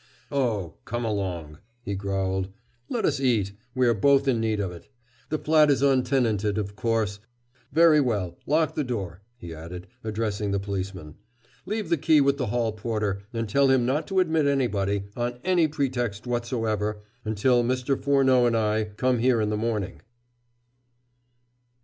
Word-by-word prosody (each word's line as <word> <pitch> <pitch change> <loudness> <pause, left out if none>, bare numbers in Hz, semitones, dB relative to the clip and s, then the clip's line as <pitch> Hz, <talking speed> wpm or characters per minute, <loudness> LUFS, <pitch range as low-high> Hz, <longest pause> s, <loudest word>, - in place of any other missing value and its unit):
"Oh, 110 - -1
come 120 +1 -3
along," 90 -7 -3 0.2
he 100 - -3
growled, 95 -1 -2 0.4
"let 235 - -1
us 145 -2 +1
eat 115 -7 +1 0.2
we 130 -1 +3
are 120 - +4
both 140 +5 +3
in 125 -4 +2
need 110 -1 0
of 95 -3 -2
it. 85 -1 -12 0.4
The 155 - 0
flat 155 -1 +4
is 140 -1 +2
untenanted, 125 -6 +2
of 100 -1 -3
course. 110 -4 -1 0.5
Very 160 0 +6
well, 100 -9 -1
lock 155 +1 +2
the 150 - -1
door," 100 - -4 0.2
he 85 -8 -8
added, 85 +3 -8 0.2
addressing 110 -2 -2
the 100 0 0
policeman. 95 -5 -5 0.5
"Leave 215 -5 -3
the 170 - +3
key 155 +1 +4
with 140 0 +3
the 125 - -2
hall 115 +1 0
porter, 105 -2 -2
and 115 -1 -3
tell 140 +6 +3
him 130 -2 +3
not 135 +5 0
to 190 -1 +1
admit 160 -4 +2
anybody, 100 -8 0
on 120 0 -2
any 180 -3 +3
pretext 125 -8 -2
whatsoever, 115 -4 -2 0.2
until 120 +3 +2
Mr. 130 +2 0
Furneaux 130 -3 +3
and 115 -1 +2
I 110 0 +1
come 125 -1 +2
here 125 0 +3
in 105 -1 0
the - - 0
morning." 110 -3 -2
115 Hz, 160 wpm, -26 LUFS, 100-135 Hz, 0.5 s, Very